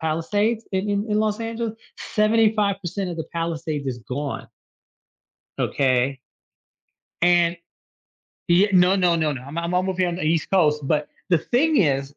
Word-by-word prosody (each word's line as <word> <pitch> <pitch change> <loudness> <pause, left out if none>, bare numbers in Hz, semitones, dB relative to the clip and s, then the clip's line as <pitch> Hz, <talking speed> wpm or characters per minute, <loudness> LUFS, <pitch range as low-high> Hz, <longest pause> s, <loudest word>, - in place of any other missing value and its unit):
Palisades 205 +8 -1
in 190 +2 -1
in 205 +2 -1
in 210 - +2
Los 215 +1 -1
Angeles. 230 -1 -3 0.3
75% 210 -4 +1
of 170 - -5
the 160 - -4
Palisades 165 -3 -3
is 125 -2 -3
gone 140 +2 -4 1.1
okay 130 0 +1 1.0
and 175 -1 +4 0.9
Yeah 185 +4 +5
No, 185 +1 +5
no, 175 -3 +3
no, 155 -2 0
no, 130 -2 -7
I'm 140 +5 -9
o - - 0
I'm 170 +2 -2
over 185 +1 0
here 180 -1 +1
on 170 - -3
the 185 - -5
East 160 0 0
Coast, 150 -6 +3
but 150 0 0 0.2
the 170 - +5
thing 280 - +1
is 140 -5 +1
175 Hz, 160 wpm, -23 LUFS, 155-205 Hz, 1.1 s, Yeah